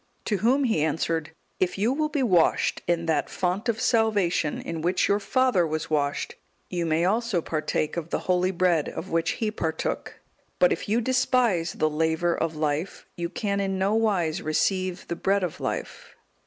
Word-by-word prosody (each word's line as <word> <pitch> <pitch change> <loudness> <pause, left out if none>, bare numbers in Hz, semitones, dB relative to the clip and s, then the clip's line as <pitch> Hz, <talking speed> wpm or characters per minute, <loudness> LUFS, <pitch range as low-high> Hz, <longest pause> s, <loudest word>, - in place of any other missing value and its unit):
To 210 - 0
whom 255 +7 +2
he 225 - +1
answered, 160 0 -1 0.3
"If 185 0 0
you 220 +6 +2
will 305 +2 0
be 290 -3 0
washed 180 -9 +2
in 170 -1 +1
that 160 -3 0
font 190 +5 -1
of 225 -1 0
salvation, 205 -9 +1
in 165 -1 -5
which 175 +3 +1
your 200 +1 +2
father 225 -5 +2
was 155 0 -3
washed, 145 -2 0 0.4
you 175 -2 -1
may 160 +2 +2
also 220 0 +1
partake 155 -1 -2
of 170 -1 -4
the - - -1
holy 180 0 +2
Bread 175 -4 +1
of 185 - -7
which 165 0 +1
he 220 -2 -2
partook; 160 -6 -3 0.4
but - - +4
if - - -6
you 225 +3 +2
despise 245 -9 +1
the 155 - +1
laver 160 +2 +1
of 165 -1 -2
life, 155 +3 -2
you 170 0 -3
can 200 +1 -2
in 195 -1 -1
no 195 +2 +1
wise 200 -8 +1
receive 185 +4 -1
the 170 - -3
Bread 195 +2 +1
of 175 - -3
life." - - -5
180 Hz, 180 wpm, -26 LUFS, 160-215 Hz, 0.4 s, but